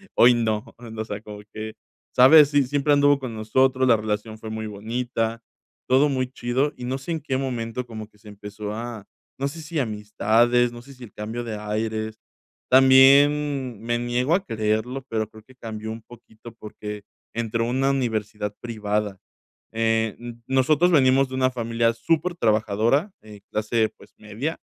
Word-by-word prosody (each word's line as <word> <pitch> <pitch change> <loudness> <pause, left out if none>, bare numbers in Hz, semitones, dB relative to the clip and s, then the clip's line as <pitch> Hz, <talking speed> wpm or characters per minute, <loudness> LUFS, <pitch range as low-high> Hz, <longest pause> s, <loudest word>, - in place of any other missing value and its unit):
hoy 120 +1 +7
no", 110 -2 -1
o 110 -2 -7
sea, 105 -1 -6
como 105 -1 -10
que, 110 0 -6 0.4
¿sabes? 145 +3 +8
Si 145 -1 +3
siempre 145 +2 +1
anduvo 145 0 +4
con 125 -4 -6
nosotros, 130 +4 +2
la 115 - +5
relación 110 +1 -3
fue 110 - -8
muy 110 0 -4
bonita, 115 +2 -3 0.5
todo 135 +3 +4
muy 130 -2 -1
chido, 130 +4 -1
y 125 - -8
no 130 +2 -2
sé 135 +6 -7
en 160 - -2
qué 130 -3 -2
momento 125 -2 -3
como 110 -2 -8
que 105 - -27
se 105 0 -14
empezó 105 +1 -7
a 115 -2 -6 0.3
no 140 - 0
sé 160 +3 -7
si 155 +1 -6
amistades, 115 +2 +2
no 120 0 -10
sé 135 +2 -14
si 125 - -13
el 110 - -12
cambio 110 +3 -5
de 110 -2 -5
aires, 110 +1 -3 0.5
también 135 -1 +5
me 120 0 -1
niego 125 +5 0
a 195 - -1
creerlo, 110 +4 -1
pero 110 -1 -2
creo 110 -1 -15
que 130 +2 -20
cambió 110 -2 -6
un 115 0 -7
poquito 120 -1 -14
porque 105 -2 -8 0.3
entró 115 0 -1
a - - -2
una 135 +2 +1
universidad 110 -5 -2
privada. 105 -4 -2 0.5
Eh, 115 -1 +1
n 120 -1 -8
nosotros 145 +6 +3
venimos 135 -2 +4
de 130 - -6
una 130 0 +2
familia 115 -1 0
supertrabajadora, 120 - +1
eh, 105 -2 -13
clase, 110 +1 0
pues, - - -18
media, 115 +10 -5
115 Hz, 170 wpm, -24 LUFS, 110-130 Hz, 0.5 s, sabes